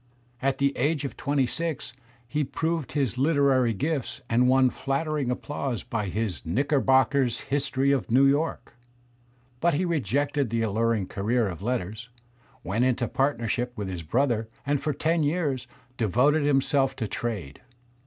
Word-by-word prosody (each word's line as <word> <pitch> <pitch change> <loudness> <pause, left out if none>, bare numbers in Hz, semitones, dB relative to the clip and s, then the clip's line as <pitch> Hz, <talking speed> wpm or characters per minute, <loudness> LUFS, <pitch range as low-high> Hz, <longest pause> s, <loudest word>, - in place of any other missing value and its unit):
At 135 0 +1
the 140 0 +1
age 145 +2 +1
of 140 - -5
twenty 140 -1 +1
six 160 -1 -3 0.3
he 150 +5 0
proved 160 +1 -2
his 130 -5 0
Uterary 135 -5 +3
gifts 135 -2 -2
and 125 +2 +4
won 130 -1 +4
flattering 140 0 -1
applause 130 -1 -3
by 105 -3 -3
his 95 - -3
"Knickerbocker's 135 - +2
History 140 -1 0
of 135 -4 0
New 130 +4 +5
York"; 145 -1 0 0.8
but 170 +1 +2
he 180 +5 +1
rejected 145 - 0
the 115 0 0
alluring 110 -1 +1
career 110 +5 0
of 90 -2 -6
letters, 115 0 -3 0.5
went 110 +6 0
into 125 -1 +1
partnership 120 -2 -1
with 105 -3 -4
his 90 -3 -4
brother 115 - 0 0.2
and 145 0 0
for 155 - 0
ten 160 +4 +1
years 145 -5 0 0.3
devoted 130 +8 +3
himself 135 -1 +2
to 115 -5 -3
trade. 100 -12 -4
130 Hz, 145 wpm, -26 LUFS, 115-145 Hz, 0.8 s, New